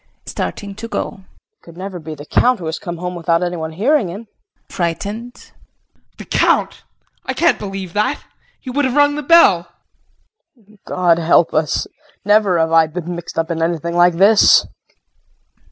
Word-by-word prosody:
KRISTIN - - -7
[Starting 200 -1 -5
to 230 - -6
go]. 220 - -4 0.3
It - - -59
could 170 0 -15
never 190 -1 -6
be 155 -1 -8
the 145 0 -11
Count 250 +9 +2
who 175 - -8
has 160 0 -4
come 175 -1 -6
home 180 +1 -5
without 170 0 0
anyone 165 -3 -4
hearing 235 - +1
him? 200 +7 -8
JEAN 405 - -47
[Frightened]. 205 +8 -5 0.7
The - - -10
Count! - - +1 0.5
I - - -2
can't 340 +1 +2
believe 195 -3 -6
that. 210 +7 -1 0.4
He 255 - -8
would 290 +2 0
have 260 0 -1
rung 290 0 +4
the 300 - -4
bell. 270 - +5 0.9
KRISTIN. 215 -3 -24
God 175 -2 +2
help 170 0 +3
us! 155 -1 0 0.4
Never 205 -3 +3
have 160 0 +1
I 165 -1 +5
been 175 +2 -6
mixed 170 -1 -9
up 165 +1 -1
in 165 -1 -3
anything 170 0 -2
like 175 0 +4
this! 200 +4 +5
180 Hz, 175 wpm, -18 LUFS, 165-215 Hz, 0.9 s, bell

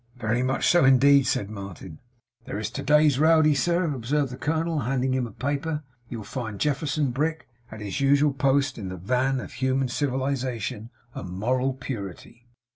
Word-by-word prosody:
'Very 120 0 -1
much 130 +1 0
so, 175 - +5
indeed,' 135 0 +5
said 100 -3 -1
Martin. 95 -5 -9 0.5
'There - - -5
is 105 +1 -3
to 140 - -5
day's 150 -1 +4
Rowdy, 155 -1 +5
sir,' 170 +6 +1
observed 135 +2 -1
the - - -5
colonel, 160 +3 -1
handing 130 0 0
him 130 -2 0
a - - -11
paper. 145 +6 -3 0.3
'You'll 115 -3 -6
find 110 0 -5
Jefferson 145 -1 0
Brick 155 +5 -2 0.2
at 110 -1 -9
his 105 +6 -4
usual 140 +1 +4
post 135 0 +1
in 95 -3 -5
the 95 - -6
van 125 +8 0
of - - -8
human 130 +1 0
civilization 130 -5 -2 0.2
and 95 - -7
moral 125 +8 0
purity. 120 -1 -8
130 Hz, 170 wpm, -25 LUFS, 115-145 Hz, 0.5 s, so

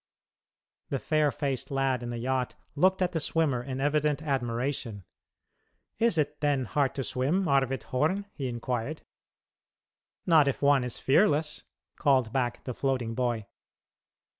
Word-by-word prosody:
The 140 - 0
fair 150 +2 +1
faced 140 -4 -3
lad 135 -2 0
in 120 - -5
the 120 - -4
yacht 130 +1 -1 0.2
looked 185 +5 +3
at 180 - 0
the 165 - -1
swimmer 150 -5 +1
in 130 +1 -5
evident 150 +1 +1
admiration, 120 -5 -2 1.0
"Is 230 -7 +3
it, 150 -1 0
then, 145 -3 +1
hard 140 +3 0
to 135 - -2
swim, 140 +10 0
Arvid 135 -3 +1
Horn?" 160 +10 0
he 135 -3 -4
inquired. 125 +4 -3 1.2
"Not 160 -4 +5
if 140 - 0
one 140 -2 +4
is 125 -2 -4
fearless," 150 0 +2 0.3
called 130 -6 +2
back 120 -2 -1
the 125 - -4
floating 125 -3 -1
boy. 120 -3 -1
135 Hz, 140 wpm, -28 LUFS, 125-150 Hz, 1.2 s, Not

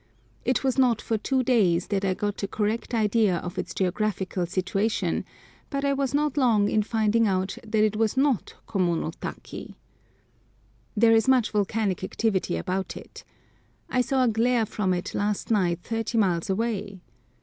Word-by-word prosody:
It 255 +2 +1
was 265 0 +1
not 245 -4 +4
for 225 -2 -2
two 260 +4 0
days 190 -9 +2
that 200 -2 0
I 190 -1 +1
got 205 +1 -3
a 200 - -1
correct 220 +4 -2
idea 215 -4 +2
of 180 +2 -5
its - - -4
geographical 190 -1 -1
situation, 195 +4 -1 0.4
but 275 -1 -2
I 280 - +2
was 275 -1 -1
not 295 0 0
long 220 -7 +3
in 215 - +2
finding 220 +1 +2
out 190 0 0
that 215 -1 +1
it 215 -1 +2
was 220 +3 0
not 270 -5 +1
Komono 175 -5 0
taki! - - -7 1.2
There 225 +1 +6
is 225 +1 +3
much 255 -4 +3
volcanic 205 -2 0
activity 190 -3 0
about 190 0 -3
it. - - -11 0.7
I 255 - +3
saw 260 +1 +1
a - - +3
glare 230 +1 +2
from 195 -2 -1
it 180 -1 -2
last 205 +2 -1
night 180 -5 +1
thirty 225 0 -2
miles 185 -4 +1
away. 205 -2 -2
215 Hz, 165 wpm, -26 LUFS, 190-235 Hz, 1.2 s, There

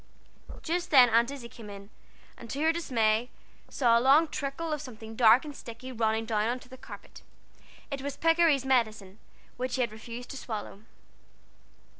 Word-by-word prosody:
Just 345 +2 -2
then 250 -5 +7
Aunt 235 +2 +4
Izzie 275 -4 -7
came 225 -2 -12
in, 200 +1 -11 0.4
and 235 - -12
to 275 - -4
her 320 +1 +4
dismay 235 -7 +1 0.4
saw 235 -3 +3
a - - -2
long 285 +6 +5
trickle 305 +2 -4
of 300 - -3
something 225 -3 -10
dark 235 +3 +6
and 295 -2 -8
sticky 245 +2 -9
running 225 -1 0
down 215 -1 0
on 245 +2 -1
to - - -15
the 260 - -11
carpet. 260 - -12 0.7
It 275 -1 -4
was 280 0 -5
Pikery's 330 -5 +3
medicine, 220 -6 0 0.4
which 250 0 -2
he 260 - 0
had 235 -3 0
refused 230 +3 -9
to 275 - -7
swallow. 215 -4 -6
245 Hz, 175 wpm, -28 LUFS, 225-275 Hz, 0.7 s, then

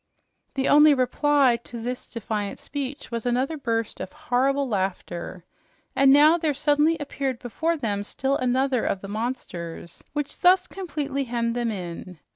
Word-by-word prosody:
The 270 0 0
only 295 0 +7
reply 265 0 +3
to 235 - -7
this 245 +2 -5
defiant 210 -3 -4
speech 280 -1 -6
was 230 -1 -3
another 255 +6 0
burst 230 -6 -2
of - - -6
horrible 275 -2 0
laughter; 185 -4 -3 0.5
and 270 0 +6
now 305 +4 +6
there 310 -3 0
suddenly 295 +3 +3
appeared 275 -3 -3
before 320 +8 -2
them 205 -7 -2
still 270 +6 -1
another 255 -1 +1
of 190 - -1
the 195 - -7
monsters, 195 -7 -5
which 295 -1 -4
thus 365 +1 +5
completely 295 -8 -3
hemmed 235 -1 -1
them 240 -1 0
in. 180 -3 -6
260 Hz, 150 wpm, -25 LUFS, 230-290 Hz, 0.5 s, only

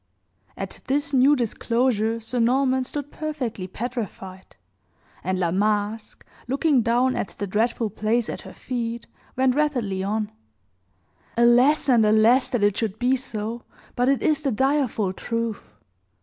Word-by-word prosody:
At - - -6
this 285 +2 0
new 270 +3 +5
disclosure, 230 -2 0
Sir 230 +2 -3
Norman 260 +2 +2
stood 290 +2 -6
perfectly 265 -11 -4
petrified; 195 -4 -6 0.7
and 185 +2 -1
La 175 -2 0
Masque, 210 +3 -1 0.2
looking 275 +1 +2
down 245 +3 +2
at - - -2
the 205 - -2
dreadful 220 +2 0
place 220 +3 0
at - - -5
her - - -11
feet, 235 -2 -4 0.3
went 260 0 +3
rapidly 250 -10 0
on: 210 +2 -2 1.1
"Alas 245 +6 +4
and 240 -4 +5
alas! 220 +4 +4
that 245 -5 -1
it 205 -1 +3
should 220 -3 -2
be 250 +2 +2
so; 230 -2 -4 0.3
but 245 +2 +2
it 275 - +1
is 310 -1 +2
the 280 -3 0
direful 255 -6 +1
truth. 230 +1 -3
235 Hz, 140 wpm, -24 LUFS, 215-260 Hz, 1.1 s, new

